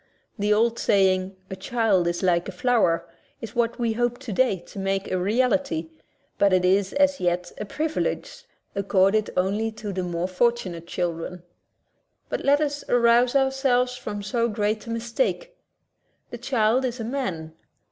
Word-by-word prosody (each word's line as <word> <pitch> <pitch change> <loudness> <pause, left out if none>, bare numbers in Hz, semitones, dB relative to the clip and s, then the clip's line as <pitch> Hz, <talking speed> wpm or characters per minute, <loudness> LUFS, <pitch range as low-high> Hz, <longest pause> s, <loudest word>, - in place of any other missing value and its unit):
The 205 +1 +1
old 230 +2 +2
saying, 190 -1 +2 0.2
"A - - -3
child 195 -2 +1
is 175 +2 -2
like 175 0 +2
a - - -4
flower," 195 -4 +1 0.3
is 225 0 -8
what 235 0 0
we 235 -2 0
hope 240 +1 0
today 250 -4 0
to - - -9
make 195 0 -2
a 185 - +1
reality, 230 - 0 0.5
but 200 -1 +4
it 180 -1 +3
is 190 +1 +2
as 285 -1 +3
yet 175 0 -1
a 210 - -3
privilege 320 - -3 0.3
accorded 200 +1 +2
only 200 +5 +1
to 210 -2 -6
the 185 - -2
more 175 0 -2
fortunate 185 -4 -1
children. 175 0 -3 0.9
But - - -3
let 285 +2 +4
us 290 -1 -2
arouse 240 +1 +4
ourselves 265 -2 +2
from 205 -4 -6
so 235 +3 0
great 215 +1 -1
a - - -6
mistake. 240 - -2 0.8
The 240 - -7
child 240 0 +1
is 250 -1 -2
a - - -3
man. 190 - -4
215 Hz, 155 wpm, -24 LUFS, 185-245 Hz, 0.9 s, but